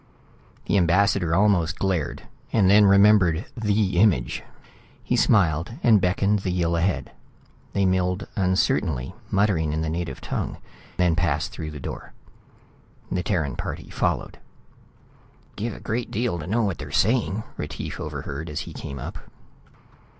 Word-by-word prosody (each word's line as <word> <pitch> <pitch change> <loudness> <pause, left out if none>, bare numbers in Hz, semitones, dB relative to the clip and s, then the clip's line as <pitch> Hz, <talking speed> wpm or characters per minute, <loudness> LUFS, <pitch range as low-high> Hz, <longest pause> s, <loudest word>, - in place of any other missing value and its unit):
The 100 - +2
ambassador 90 -1 +2
almost 95 -4 +2
glared, 90 -7 -1 0.3
then 105 0 +5
remembered 100 -2 +5
the 105 -5 +1
image. 90 - +2 0.6
He - - 0
smiled 85 -1 +2
and 110 -4 +5
beckoned 100 +3 +2
the 95 - -3
Yill 85 -2 0
ahead. 90 +2 -1 0.6
They 100 -1 +2
milled 90 +1 +1
uncertainly, 90 -8 0 0.2
muttering 95 -7 +1
in 80 - -1
the 80 -1 -2
native 85 +1 -4
tongue, - - -4 0.4
then 90 -3 +3
passed 85 +1 0
through 80 -7 -6
the 75 -1 -8
door. - - -7 1.0
The 90 - 0
Terran 80 - -1
party - - -6
followed. - - -2 0.6
" - - -31
give 110 +1 -3
a - - -10
great 115 +2 -3
deal 110 -5 -1
to 80 - -7
know 115 +5 +1
what 100 -7 -1
they're 75 -1 -7
saying," 110 - +1
Retief - - -6
overheard 75 +4 -5
as 75 - -3
he - - -8
came 70 - -7
up. - - -6
90 Hz, 145 wpm, -24 LUFS, 80-100 Hz, 1.0 s, then